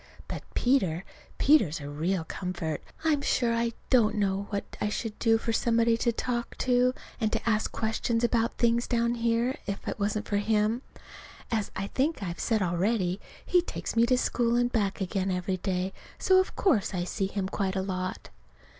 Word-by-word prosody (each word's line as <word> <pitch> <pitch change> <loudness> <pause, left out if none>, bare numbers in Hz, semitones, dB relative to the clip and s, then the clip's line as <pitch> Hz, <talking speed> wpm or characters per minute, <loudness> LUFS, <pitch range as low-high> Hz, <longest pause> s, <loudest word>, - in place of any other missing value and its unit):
But - - -5
Peter 195 -10 +2 0.3
Peter's 220 - +4
a 140 - -7
real 165 +5 -1
comfort. 165 -3 -4 0.2
I'm 310 -3 +2
sure 240 -4 +1
I 230 0 0 0.2
don't 225 -4 +4
know 200 -1 0
what 200 -1 -4
I 210 - +1
should 215 0 -4
do 225 -1 +4
for 225 0 -2
somebody 230 0 +3
to 235 +1 +1
talk 240 +1 -3
to 250 0 +3 0.2
and 220 -2 +1
ask 220 -2 +1
questions 230 +1 -1
about 235 -1 +1
things 235 0 +2
down 235 -1 +1
here, 235 +2 0
if 200 0 -4
it - - -3
wasn't 210 +1 -1
for 205 - +1
him. 215 +3 +1 0.7
As 220 -3 0
I 195 - -2
think 270 +4 -1
I've 170 -2 -4
said 220 -4 +1
already, 185 +2 0 0.2
he 360 - +4
takes 345 - -5
me 230 +1 +4
to 255 0 +3
school 235 -1 +1
and 245 0 +2
back 205 -4 0
again 190 0 -1
every 185 0 -1
day; 185 +1 -2 0.2
so 375 0 +5
of 375 - -1
course 225 - +2
I 175 - 0
see 190 +2 -1
him 195 -1 -2
quite 195 0 -2
a 190 - 0
lot. 185 -1 -4
220 Hz, 180 wpm, -28 LUFS, 190-235 Hz, 0.7 s, so